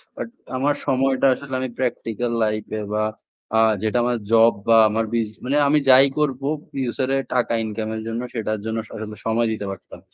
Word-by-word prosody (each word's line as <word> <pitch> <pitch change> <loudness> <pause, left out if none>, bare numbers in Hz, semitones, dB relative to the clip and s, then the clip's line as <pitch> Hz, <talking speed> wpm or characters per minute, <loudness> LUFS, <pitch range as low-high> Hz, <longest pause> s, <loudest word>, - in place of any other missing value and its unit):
But - - -5 0.3
আমার 145 +2 +1
সময়টা 135 -1 +2
আসলে 135 +1 -8
আমি 130 0 -2
প্র্যাকটিক্যাল 120 -2 -2
লাইফ 110 -1 0 0.2
এ - - -4
বা 110 0 +1 0.5
আ - - +5 0.2
যেটা 110 +2 +1
আমার 120 -1 +1
জব 115 0 +6
বা 115 - +6
আমার 110 +1 0 0.4
মানে 140 +3 +1
আমি 150 +1 +4
যাই 130 +1 +8
করব 140 -3 0 0.3
ফিউচার 130 0 -2
এর 135 - -1
টাকা 125 -2 +1
ইনকাম 110 0 -4
এর 110 - -4
জন্য 115 +1 -3
সেটার 110 -2 -2
জন্য 110 0 -2
আসলে 110 -1 -8
সময় 115 +1 +2
দিতে 110 -2 -4
পারতাম। 95 - -10
115 Hz, 185 wpm, -22 LUFS, 110-130 Hz, 0.5 s, যাই